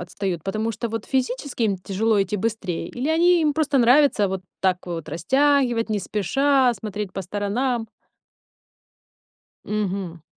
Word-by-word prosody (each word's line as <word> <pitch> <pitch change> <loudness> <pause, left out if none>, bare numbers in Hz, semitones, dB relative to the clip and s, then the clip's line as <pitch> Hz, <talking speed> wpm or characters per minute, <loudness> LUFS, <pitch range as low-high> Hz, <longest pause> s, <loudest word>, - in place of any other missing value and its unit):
отстают? 175 -1 -4
Потому 215 +5 -2
что 230 +2 -4
вот 225 -1 -4
физически 260 -1 -1
им 200 -3 +1
тяжело 200 +3 0
идти 195 +2 -3
быстрее? 200 -5 -3
Или 255 +5 -4
они 345 +1 +4
им 300 - +2
просто 295 -2 0
нравится 245 -3 +5
вот 190 0 -3 0.2
так 185 -1 +2
вот 165 -3 -5
растягивать 245 - +2
не 210 - +1
спеша, 255 +7 +2
смотреть 210 -3 -5
по - - -4
сторонам? 220 +6 -1 1.8
Мгм. 195 -5 -3
215 Hz, 140 wpm, -23 LUFS, 190-260 Hz, 1.8 s, нравится